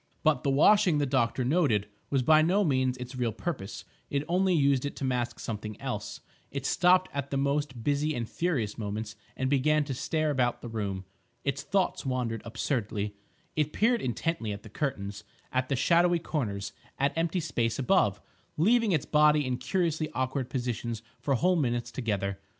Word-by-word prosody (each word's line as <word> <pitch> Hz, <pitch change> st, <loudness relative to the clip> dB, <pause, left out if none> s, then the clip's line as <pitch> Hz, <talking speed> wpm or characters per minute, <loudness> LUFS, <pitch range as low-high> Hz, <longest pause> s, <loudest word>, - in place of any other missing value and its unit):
But 155 Hz, -2 st, +3 dB
the 140 Hz, -, 0 dB
washing, 165 Hz, +4 st, +5 dB
the 145 Hz, -, +2 dB
doctor 130 Hz, -2 st, +1 dB
noted, 130 Hz, -, +2 dB, 0.2 s
was 135 Hz, -2 st, +1 dB
by 155 Hz, +4 st, +6 dB
no 185 Hz, +6 st, +3 dB
means 130 Hz, -5 st, +1 dB
its 125 Hz, +1 st, -7 dB
real 120 Hz, -3 st, 0 dB
purpose; 110 Hz, -, -5 dB, 0.2 s
it 140 Hz, 0 st, 0 dB
only 185 Hz, +1 st, +2 dB
used 140 Hz, -4 st, +3 dB
it 145 Hz, -, -3 dB
to -, -, -6 dB
mask 120 Hz, -2 st, -1 dB
something 110 Hz, -1 st, -5 dB
else; -, -, -5 dB, 0.3 s
it 140 Hz, -1 st, -5 dB
stopped 180 Hz, +3 st, +4 dB
at 140 Hz, 0 st, -3 dB
the 140 Hz, -, -1 dB
most 140 Hz, -3 st, -1 dB
busy 145 Hz, +2 st, +1 dB
and 115 Hz, -2 st, -3 dB
furious 130 Hz, -, -1 dB
moments 105 Hz, +1 st, -4 dB, 0.2 s
and 130 Hz, -, 0 dB
began 150 Hz, +3 st, +3 dB
to 140 Hz, -2 st, -4 dB
stare 155 Hz, +3 st, 0 dB
about 125 Hz, -4 st, 0 dB
the -, -, -5 dB
room. 100 Hz, -4 st, -3 dB, 0.4 s
Its 140 Hz, 0 st, -1 dB
thoughts 190 Hz, +4 st, 0 dB
wandered 125 Hz, -4 st, -2 dB
absurdly. 110 Hz, -3 st, -2 dB, 0.4 s
It 150 Hz, -1 st, 0 dB
peered 235 Hz, +1 st, +2 dB
intently 125 Hz, -2 st, -2 dB
at 100 Hz, 0 st, -6 dB
the 110 Hz, -, -11 dB
curtains; 100 Hz, -6 st, -3 dB, 0.3 s
at 130 Hz, 0 st, 0 dB
the 140 Hz, -, +1 dB
shadowy 175 Hz, +6 st, +4 dB
corners; 110 Hz, -12 st, -3 dB, 0.2 s
at 140 Hz, +1 st, +1 dB
empty 165 Hz, +2 st, 0 dB
space 120 Hz, -8 st, -1 dB
above; 130 Hz, -, +2 dB, 0.4 s
leaving 220 Hz, +5 st, +4 dB
its 150 Hz, -, +1 dB
body 150 Hz, -1 st, +4 dB
in 125 Hz, -1 st, -1 dB
curiously 165 Hz, -3 st, 0 dB
awkward 130 Hz, 0 st, -1 dB
positions 120 Hz, -3 st, -3 dB, 0.2 s
for 140 Hz, -, +1 dB
whole 180 Hz, +8 st, +3 dB
minutes 120 Hz, -7 st, 0 dB
together. 100 Hz, -5 st, -2 dB
135 Hz, 175 wpm, -29 LUFS, 120-155 Hz, 0.4 s, by